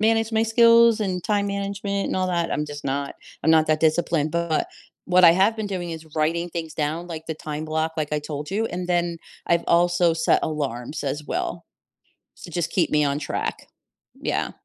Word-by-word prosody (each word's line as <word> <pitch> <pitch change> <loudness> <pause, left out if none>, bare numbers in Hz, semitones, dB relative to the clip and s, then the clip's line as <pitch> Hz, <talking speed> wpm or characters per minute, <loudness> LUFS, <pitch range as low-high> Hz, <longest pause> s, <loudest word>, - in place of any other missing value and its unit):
manage 225 +1 +2
my 220 0 +3
skills 230 0 +5
and 185 -4 -2
time 205 -1 +1
management 200 0 -2
and - - -2
all 185 0 +1
that 170 -2 0
I'm 150 - -1
just 145 0 -8
not 140 +1 -2 0.3
I'm 160 - +3
not 160 -1 +5
that 155 0 +2
disciplined, 160 -1 +1
but 170 -2 0 0.4
what 180 0 +5
I 165 - +9
have 195 +6 +3
been 220 - -3
doing 180 -4 -4
is 160 -1 -7
writing 165 +3 0
things 165 -2 -5
down, 155 +3 -2
like 160 -1 -7
the 160 - -3
time 155 -1 -5
block 160 +1 -1
like 150 -1 -2
I 150 - +1
told 150 0 -6
you, 210 +3 0
and 180 -2 -5
then 175 -1 0 0.3
I've 170 0 +2
also 175 0 +3
set 165 0 +2
alarms 140 -3 -3
as 145 +2 -3
well - - -3 0.8
to 175 - -9
just 170 -1 -1
keep 180 -5 +1
me 150 0 +3
on 140 0 0
track. 150 - -4 0.5
Yeah. - - -1
170 Hz, 200 wpm, -23 LUFS, 155-190 Hz, 0.8 s, I